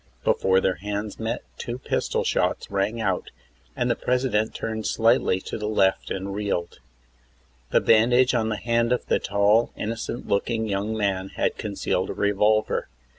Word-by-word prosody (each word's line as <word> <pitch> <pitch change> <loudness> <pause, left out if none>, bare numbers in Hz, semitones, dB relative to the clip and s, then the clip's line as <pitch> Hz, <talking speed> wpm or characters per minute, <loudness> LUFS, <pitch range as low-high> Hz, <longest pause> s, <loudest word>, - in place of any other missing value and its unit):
Before 95 0 +3
their 95 -1 0
hands 105 +2 -4
met 110 0 -3 0.2
two 120 +1 -4
pistol 130 - -1
shots - - 0
rang 100 +4 0
out, 95 -5 -1 0.5
and 120 - 0
the 120 - +2
President 125 -4 0
turned 110 -1 -3
slightly 115 -5 +3
to - - -6
the 105 - -3
left 95 -3 +2
and 95 +1 -4
reeled. 100 -4 -3 0.9
The - - +3
bandage 120 +3 +4
on 110 -2 +1
the 110 - -1
hand 115 +1 +1
of 125 - 0
the - - +1
tall, 100 +3 +2
innocent 115 +2 -4
looking 110 +2 0
young 105 +2 -2
man 95 -2 -1
had - - 0
concealed 100 -2 -2
a - - -2
revolver. 105 +1 +1
110 Hz, 160 wpm, -24 LUFS, 100-115 Hz, 0.9 s, bandage